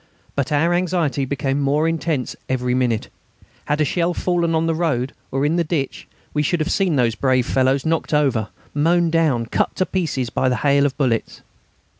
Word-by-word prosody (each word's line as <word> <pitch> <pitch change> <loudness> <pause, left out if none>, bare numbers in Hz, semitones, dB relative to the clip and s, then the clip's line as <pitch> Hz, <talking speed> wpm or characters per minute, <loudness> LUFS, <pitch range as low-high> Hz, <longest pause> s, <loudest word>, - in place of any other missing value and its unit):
But 140 0 -1
our 160 +4 +2
anxiety 175 -6 0
became 140 +1 -1
more 145 +3 +2
intense 160 -5 -1
every 125 -1 0
minute. 125 -4 0 0.6
Had 150 +1 0
a - - +3
shell 170 +4 0
fallen 170 -2 0
on 160 0 +1
the 165 - +1
road 150 -6 -1 0.2
or 135 +2 0
in 160 +4 +1
the 170 - +2
ditch, 150 -4 -3 0.3
we 150 - +1
should 165 +4 0
have 155 +3 -1
seen 190 -5 +1
those 120 -4 +2
brave 130 +2 +1
fellows 130 +1 +1
knocked 160 0 0
over, 135 -8 +2 0.3
mown 170 +3 +2
down, 155 -8 +2
cut - - -1
to 185 - +1
pieces, 150 -11 -2
by 130 - +1
the 125 - +1
hail 140 0 +4
of 135 -1 -6
bullets. 125 -6 -1
145 Hz, 190 wpm, -21 LUFS, 130-165 Hz, 0.6 s, hail